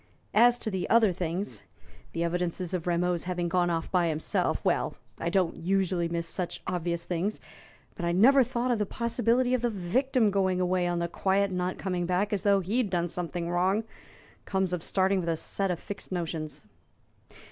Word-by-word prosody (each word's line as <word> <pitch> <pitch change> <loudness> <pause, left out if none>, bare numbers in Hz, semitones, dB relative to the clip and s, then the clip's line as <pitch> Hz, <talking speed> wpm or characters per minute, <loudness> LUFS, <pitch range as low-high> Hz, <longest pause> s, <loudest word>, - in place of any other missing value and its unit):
As 240 +2 +6
to 220 - -4
the 190 -2 -2
other 225 -5 +5
things 180 +3 -3 0.5
the 170 - -1
evidences 175 +1 -2
of 180 -2 -2
Rameau's 175 0 0
having 175 -1 -1
gone 175 0 +2
off 165 -1 -2
by 180 -2 +3
himself 155 -1 0
well, - - +1 0.2
I 170 - -1
don't 180 -2 +1
usually 185 -1 0
miss 170 0 -2
such 180 0 -4
obvious 170 -1 -2
things; 180 +4 -2 0.5
but - - -7
I 170 - +1
never 250 +10 +6
thought 245 0 0
of 235 - +1
the 210 - 0
possibility 240 +2 +1
of 255 - +2
the 240 - +1
victim 225 +4 +1
going 190 -2 +1
away 180 0 +1
on 175 0 0
the 170 0 0
quiet 195 +3 +1
and 185 -1 -2
not 180 +1 -2
coming 180 -3 -2
back, 190 +4 0
as 200 - 0
though 200 -1 +3
he'd 210 +4 0
done 175 -1 0
something 175 0 -3
wrong. 185 +5 +1 0.6
Comes 190 -2 0
of 180 - -1
starting 190 0 +2
with 170 -2 -2
a 165 - 0
set 195 +4 -2
of 175 -2 -1
fixed 205 -2 -7
notions." 160 -5 -4
180 Hz, 190 wpm, -28 LUFS, 170-200 Hz, 0.6 s, As